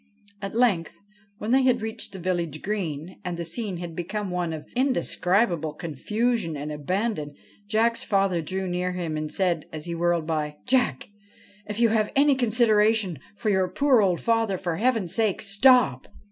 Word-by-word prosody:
At 195 Hz, +1 st, -5 dB
length, 220 Hz, -9 st, +1 dB, 0.4 s
when 215 Hz, +2 st, -3 dB
they 265 Hz, +1 st, +5 dB
had 250 Hz, -3 st, +2 dB
reached 220 Hz, +1 st, -5 dB
the 195 Hz, -, -8 dB
village 170 Hz, -4 st, -2 dB
green, 180 Hz, -5 st, -4 dB
and 180 Hz, -1 st, -4 dB
the 170 Hz, -, -4 dB
scene 195 Hz, +2 st, -3 dB
had 170 Hz, -1 st, -7 dB
become 190 Hz, +3 st, -3 dB
one 175 Hz, -2 st, -1 dB
of 155 Hz, -1 st, -6 dB
indescribable 180 Hz, -, +1 dB
confusion 180 Hz, -, -2 dB
and 150 Hz, +2 st, -5 dB
abandon, 150 Hz, 0 st, -2 dB, 0.3 s
Jack's 230 Hz, +2 st, +2 dB
father 195 Hz, -4 st, +1 dB
drew 190 Hz, +4 st, -3 dB
near 180 Hz, 0 st, -1 dB
him 170 Hz, -3 st, -3 dB
and 155 Hz, 0 st, -3 dB
said, 175 Hz, -5 st, 0 dB
as 155 Hz, 0 st, -6 dB
he 170 Hz, -, -4 dB
whirled 170 Hz, -1 st, +1 dB
by: 150 Hz, -2 st, -2 dB
' -, -, -36 dB
Jack 255 Hz, -, +1 dB
I 205 Hz, -, -32 dB, 0.5 s
if 210 Hz, +1 st, -3 dB
you 235 Hz, -1 st, +5 dB
have 215 Hz, -1 st, +1 dB
any 285 Hz, +1 st, +5 dB
consideration 220 Hz, -, +2 dB, 0.2 s
for 215 Hz, 0 st, -1 dB
your 190 Hz, -1 st, +2 dB
poor 255 Hz, +5 st, +3 dB
old 185 Hz, -4 st, +2 dB
father, 225 Hz, -4 st, +1 dB
for 175 Hz, -3 st, -3 dB
heaven's 225 Hz, -6 st, +1 dB
sake, 220 Hz, -4 st, +1 dB
stop 210 Hz, -, +4 dB
190 Hz, 175 wpm, -25 LUFS, 170-225 Hz, 0.5 s, they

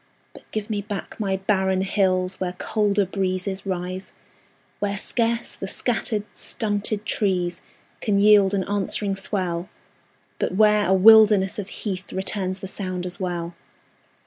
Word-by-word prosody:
But -, -, -16 dB
give 215 Hz, -1 st, -4 dB
me 210 Hz, -2 st, -2 dB
back 205 Hz, +1 st, -6 dB
my 195 Hz, -3 st, 0 dB
barren 190 Hz, -1 st, +1 dB
hills 190 Hz, -1 st, +1 dB
Where 180 Hz, -1 st, -2 dB
colder 205 Hz, +1 st, 0 dB
breezes 190 Hz, 0 st, -3 dB
rise; 185 Hz, 0 st, -4 dB, 0.7 s
Where 200 Hz, -1 st, -1 dB
scarce 230 Hz, +2 st, -1 dB
the 195 Hz, -, -6 dB
scattered, 220 Hz, -1 st, 0 dB
stunted 210 Hz, 0 st, -1 dB
trees 180 Hz, -5 st, 0 dB, 0.4 s
Can 205 Hz, -2 st, 0 dB
yield 205 Hz, -1 st, +5 dB
an 190 Hz, -, 0 dB
answering 200 Hz, 0 st, -1 dB
swell, 185 Hz, -3 st, -2 dB, 0.7 s
But -, -, -1 dB
where 210 Hz, 0 st, +4 dB
a 190 Hz, -, +3 dB
wilderness 210 Hz, -1 st, +6 dB
of 200 Hz, -1 st, -5 dB
heath 195 Hz, -3 st, -5 dB
Returns 190 Hz, -1 st, -2 dB
the 190 Hz, -, -5 dB
sound 185 Hz, -2 st, -4 dB
as 180 Hz, -1 st, -5 dB
well. 175 Hz, -2 st, -3 dB
195 Hz, 140 wpm, -23 LUFS, 185-210 Hz, 0.7 s, wilderness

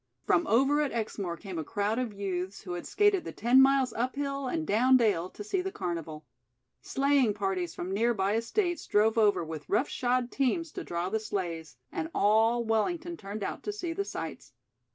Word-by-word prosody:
From 175 Hz, -, +2 dB
over 270 Hz, +7 st, +3 dB
at 290 Hz, -, 0 dB
Exmoor 200 Hz, -6 st, -3 dB
came 190 Hz, -4 st, -6 dB
a -, -, -2 dB
crowd 210 Hz, +6 st, -1 dB
of 250 Hz, -3 st, -2 dB
youths 190 Hz, -1 st, -4 dB
who 180 Hz, -, -6 dB
had 175 Hz, -, -5 dB
skated 415 Hz, -3 st, +3 dB
the -, -, -6 dB
ten 245 Hz, +4 st, +4 dB
miles 270 Hz, -2 st, +4 dB
up 250 Hz, +3 st, -2 dB
hill 275 Hz, -1 st, -2 dB
and 320 Hz, +4 st, -2 dB
down 255 Hz, +4 st, +4 dB
dale 195 Hz, -7 st, +1 dB
to 210 Hz, -, -9 dB
see 360 Hz, -, -1 dB
the 380 Hz, +1 st, -4 dB
carnival. 165 Hz, -, -5 dB, 0.6 s
Sleighing 270 Hz, -, +2 dB
parties 190 Hz, -4 st, -2 dB
from 185 Hz, +2 st, -4 dB
nearby 210 Hz, -2 st, +1 dB
estates 345 Hz, -, -1 dB
drove 215 Hz, +2 st, +3 dB
over 205 Hz, -6 st, +3 dB
with 155 Hz, -2 st, -7 dB
rough 230 Hz, +8 st, +2 dB
shod 245 Hz, 0 st, 0 dB
teams 300 Hz, +5 st, 0 dB
to -, -, -6 dB
draw 175 Hz, +1 st, -3 dB
the 220 Hz, +2 st, 0 dB
sleighs, 170 Hz, -, -4 dB
and 160 Hz, 0 st, -3 dB
all 225 Hz, +3 st, +3 dB
Wellington 330 Hz, -, -1 dB
turned 205 Hz, -4 st, -6 dB
out -, -, -4 dB
to 415 Hz, -, -3 dB
see 360 Hz, -5 st, -4 dB
the 400 Hz, -, -1 dB
sights. -, -, -7 dB
220 Hz, 195 wpm, -29 LUFS, 190-270 Hz, 0.6 s, ten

